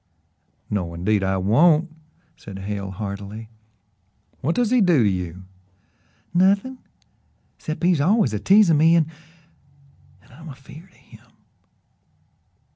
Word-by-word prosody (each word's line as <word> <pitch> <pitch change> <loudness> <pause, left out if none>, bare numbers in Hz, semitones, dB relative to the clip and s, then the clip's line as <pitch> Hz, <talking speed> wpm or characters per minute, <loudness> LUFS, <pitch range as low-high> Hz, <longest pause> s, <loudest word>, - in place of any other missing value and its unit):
"No, 90 -5 -3
indeed, 100 +4 0
I 95 0 0
won't," 155 - +2 0.4
said 100 -2 -11
Hale 100 0 -5
heartily. 100 +2 -7 0.9
"What 160 +6 -1
does 245 -2 0
he 250 -2 +3
do 170 - +4
to - - +3
you?" 90 -1 -4 0.9
"Nothin' 200 +8 +1 0.8
'cept 155 +1 -6
he's 175 -4 +2
always 195 - +2
a 105 - -2
teasin' 190 - +4
me, 165 +2 +5
an' 160 -1 +1 1.1
an' - - -23
I'm 160 +5 -12
afeered 145 +6 -13
o' - - -27
him." - - -19
140 Hz, 120 wpm, -22 LUFS, -, 1.1 s, me